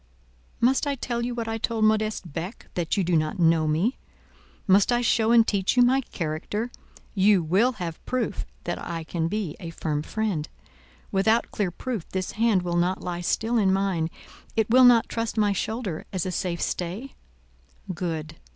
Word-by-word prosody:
"Must 260 Hz, +4 st, +3 dB
I 280 Hz, -, 0 dB
tell 235 Hz, -2 st, -3 dB
you 240 Hz, 0 st, -2 dB
what 230 Hz, -2 st, -3 dB
I 225 Hz, 0 st, -2 dB
told 225 Hz, -1 st, +1 dB
Modeste 215 Hz, -6 st, 0 dB
Beck—that 175 Hz, -, -4 dB
you 195 Hz, -, +2 dB
do 175 Hz, 0 st, +1 dB
not 155 Hz, +3 st, 0 dB
know 165 Hz, -2 st, +3 dB
me? 170 Hz, -, +1 dB, 0.7 s
Must 200 Hz, +3 st, +4 dB
I 240 Hz, 0 st, +2 dB
show 225 Hz, -1 st, +2 dB
and 230 Hz, -1 st, +6 dB
teach 200 Hz, +3 st, +1 dB
you 245 Hz, -, +7 dB
my 260 Hz, +2 st, +4 dB
character? 205 Hz, +4 st, -4 dB, 0.4 s
You 195 Hz, -2 st, +4 dB
will 200 Hz, +11 st, +3 dB
have 175 Hz, -7 st, -6 dB
proof 240 Hz, -6 st, -1 dB, 0.2 s
that 175 Hz, -, -4 dB
I 165 Hz, -1 st, -4 dB
can 165 Hz, 0 st, -2 dB
be 190 Hz, -4 st, -3 dB
a 170 Hz, -4 st, -6 dB
firm 155 Hz, -2 st, -2 dB
friend? 185 Hz, -4 st, -2 dB, 0.6 s
Without 220 Hz, +4 st, +2 dB
clear 200 Hz, -4 st, -1 dB
proof 215 Hz, +1 st, -5 dB
this 185 Hz, -1 st, -3 dB
hand 215 Hz, -4 st, +2 dB
will 175 Hz, -1 st, -1 dB
not 180 Hz, +2 st, 0 dB
lie 175 Hz, -1 st, -3 dB
still 225 Hz, +6 st, +1 dB
in 195 Hz, -3 st, +3 dB
mine, 190 Hz, -4 st, 0 dB, 0.5 s
it 220 Hz, -1 st, +1 dB
will 255 Hz, +1 st, +7 dB
not 240 Hz, -2 st, +6 dB
trust 230 Hz, -1 st, -3 dB
my 205 Hz, -2 st, +3 dB
shoulder 205 Hz, -3 st, -3 dB
as 185 Hz, -2 st, -2 dB
a 185 Hz, -, -2 dB
safe 175 Hz, -1 st, -2 dB
stay? 190 Hz, +10 st, -3 dB, 0.8 s
Good. 160 Hz, -2 st, -4 dB
195 Hz, 180 wpm, -25 LUFS, 170-230 Hz, 0.8 s, you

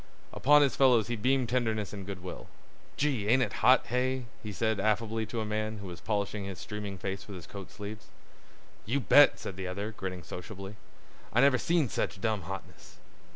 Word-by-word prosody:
Upon 145 Hz, +2 st, +6 dB
his 140 Hz, -, +1 dB
fellows 125 Hz, -5 st, +4 dB
he 120 Hz, -, 0 dB
beamed 125 Hz, +2 st, +1 dB
tenderness 110 Hz, -5 st, 0 dB
and 100 Hz, -2 st, -7 dB
good 95 Hz, -3 st, -6 dB
will. 90 Hz, -, -7 dB, 0.5 s
"Gee! 135 Hz, -8 st, 0 dB
ain't 130 Hz, +4 st, +5 dB
it -, -, -3 dB
hot, 130 Hz, +1 st, +6 dB
hey?" 130 Hz, +1 st, 0 dB, 0.2 s
he 105 Hz, -, -6 dB
said 110 Hz, +1 st, 0 dB
affably 110 Hz, +2 st, 0 dB
to 115 Hz, -, -3 dB
a -, -, -2 dB
man 110 Hz, +1 st, -2 dB
who 100 Hz, -, -8 dB
was 85 Hz, -3 st, -8 dB
polishing 105 Hz, -1 st, -2 dB
his 95 Hz, -2 st, -6 dB
streaming 105 Hz, 0 st, -6 dB
face 95 Hz, +2 st, -5 dB
with 100 Hz, -, -8 dB
his 85 Hz, -3 st, -9 dB
coat 100 Hz, 0 st, -9 dB
sleeves. 105 Hz, 0 st, -8 dB, 0.8 s
"You 130 Hz, +6 st, +1 dB
bet!" 145 Hz, +2 st, +6 dB
said 95 Hz, -, -7 dB
the 95 Hz, -1 st, -4 dB
other, 100 Hz, +4 st, -4 dB
grinning 95 Hz, -4 st, -6 dB
sociably. 95 Hz, +5 st, -8 dB, 0.6 s
"I 120 Hz, -, +2 dB
never 135 Hz, -2 st, +5 dB
seen 165 Hz, -4 st, +2 dB
sech 105 Hz, -, -2 dB
dumb 110 Hz, 0 st, 0 dB
hotness." 95 Hz, 0 st, -9 dB
110 Hz, 195 wpm, -30 LUFS, 100-125 Hz, 0.8 s, Upon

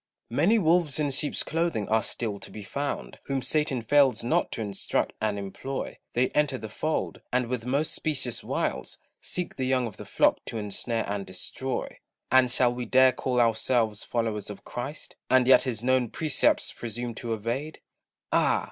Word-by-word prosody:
Many 225 Hz, +3 st, +4 dB
wolves 165 Hz, -5 st, +2 dB
in 145 Hz, -2 st, +1 dB
sheep's 145 Hz, +2 st, +1 dB
clothing 165 Hz, -10 st, -1 dB
are 110 Hz, +1 st, +3 dB
still 110 Hz, -4 st, -2 dB
to -, -, -9 dB
be 105 Hz, -, -8 dB
found, 140 Hz, +8 st, -4 dB
Whom 135 Hz, -2 st, -1 dB
Satan 150 Hz, -5 st, 0 dB
fails 135 Hz, -2 st, +4 dB
not 120 Hz, -, +1 dB
to -, -, -4 dB
instruct 100 Hz, -2 st, -1 dB
and 105 Hz, -1 st, 0 dB
employ; 100 Hz, +7 st, -5 dB
They 125 Hz, +2 st, +2 dB
enter 145 Hz, -3 st, +1 dB
the 110 Hz, -, -7 dB
fold, 155 Hz, +8 st, -2 dB
and 125 Hz, 0 st, +2 dB
with 120 Hz, 0 st, -3 dB
most 140 Hz, +4 st, +1 dB
specious 130 Hz, -6 st, -2 dB
wiles, -, -, -2 dB, 0.2 s
Seek 180 Hz, -1 st, -4 dB
the 130 Hz, -, -1 dB
young 130 Hz, -1 st, +2 dB
of 110 Hz, -4 st, -7 dB
the -, -, -8 dB
flock -, -, +2 dB
to 115 Hz, -, -5 dB
ensnare 110 Hz, +2 st, -2 dB
and 100 Hz, 0 st, -2 dB
destroy. 95 Hz, +8 st, -4 dB, 0.3 s
And 130 Hz, -1 st, +6 dB
shall 125 Hz, 0 st, +3 dB
we 125 Hz, -1 st, -5 dB
dare 130 Hz, +2 st, +6 dB
call 125 Hz, 0 st, -1 dB
ourselves 115 Hz, -1 st, +2 dB
followers 115 Hz, -3 st, -2 dB
of 100 Hz, -1 st, -9 dB
Christ, 135 Hz, +5 st, -6 dB
And 130 Hz, 0 st, +5 dB
yet 130 Hz, -1 st, +8 dB
his 120 Hz, -3 st, -2 dB
known 130 Hz, -2 st, +2 dB
precepts 155 Hz, +1 st, +1 dB
presume 120 Hz, +1 st, -5 dB
to 115 Hz, 0 st, -4 dB
evade? 120 Hz, +8 st, -4 dB, 0.5 s
Ah! -, -, +3 dB
125 Hz, 175 wpm, -27 LUFS, 110-135 Hz, 0.5 s, yet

